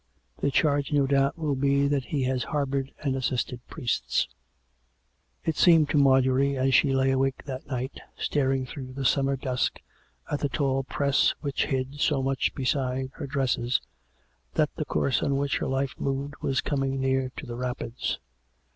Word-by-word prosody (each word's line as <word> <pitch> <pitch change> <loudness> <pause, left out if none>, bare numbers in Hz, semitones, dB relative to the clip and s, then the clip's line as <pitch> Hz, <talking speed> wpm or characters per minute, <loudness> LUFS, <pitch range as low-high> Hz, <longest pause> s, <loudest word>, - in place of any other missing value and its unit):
The - - +1
charge, 145 0 +2
no 145 -2 +3
doubt, 140 +2 +2
will 155 -3 0
be 140 +1 +2
that 140 -3 0
he 140 -3 -1
has 130 -1 0
harboured 140 -2 -1
and 135 -3 0
assisted 125 -1 -1
priests." 130 -7 -1 1.2
It 160 - 0
seemed 165 -4 +5
to - - +2
Marjorie, 135 0 +4
as 130 +1 +2
she 140 - +5
lay 135 0 +3
awake 135 0 0
that 130 -2 -6
night, 130 0 -4 0.2
staring 135 -2 0
through 130 0 -8
the 135 0 -4
summer 135 +1 +3
dusk 130 -2 -1 0.5
at 145 - 0
the 145 - 0
tall 135 -1 +1
press 140 +1 +2
which 140 -2 0
hid 135 0 -2
so 140 -2 +2
much 135 0 0
beside 130 -1 -1
her - - -6
dresses, 130 -3 +1 0.8
that - - +2
the - - -3
course 130 - +1
on 140 -1 +1
which 140 -1 0
her - - -2
life 135 0 -1
moved 140 +1 -2
was 135 - +1
coming 135 -2 -1
near 130 -1 +1
to - - -6
the 120 -2 -6
rapids. 125 -1 -3
135 Hz, 170 wpm, -27 LUFS, 130-140 Hz, 1.2 s, seemed